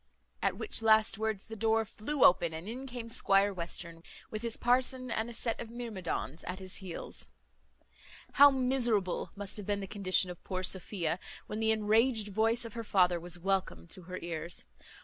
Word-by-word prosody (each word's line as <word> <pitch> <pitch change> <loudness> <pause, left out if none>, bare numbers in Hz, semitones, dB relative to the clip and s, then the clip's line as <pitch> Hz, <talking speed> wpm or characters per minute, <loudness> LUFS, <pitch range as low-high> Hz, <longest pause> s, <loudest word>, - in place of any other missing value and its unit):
At - - +1
which 425 - -1
last 220 -1 +4
words 220 -3 -2
the 225 - -7
door 220 +1 +2
flew 250 +8 -2
open, 170 -2 +4
and 165 +4 -7
in 255 +4 -6
came 245 -2 -6
Squire 200 -3 +3
Western, 170 -1 -4 0.3
with 215 - -4
his 235 -1 -3
parson 255 +1 +1
and 225 +2 -1
a - - -7
set 230 0 -2
of 230 - -7
myrmidons 205 - -4
at 180 +1 -4
his 190 0 -4
heels. 185 -4 -5 1.0
How 285 +1 +8
miserable 250 -8 +1
must 200 0 -4
have 205 - -7
been 205 -1 0
the 195 - -4
condition 185 -2 +3
of 175 - -12
poor 185 0 -3
Sophia, 185 -1 0 0.3
when 215 - -5
the 220 0 +1
enraged 220 +1 +3
voice 225 +4 +1
of 230 - -8
her 230 -1 -5
father 180 -4 +3
was 175 +1 0
welcome 185 - -1
to - - -4
her 185 - -4
ears! 170 0 -3
210 Hz, 185 wpm, -31 LUFS, 185-230 Hz, 1.0 s, How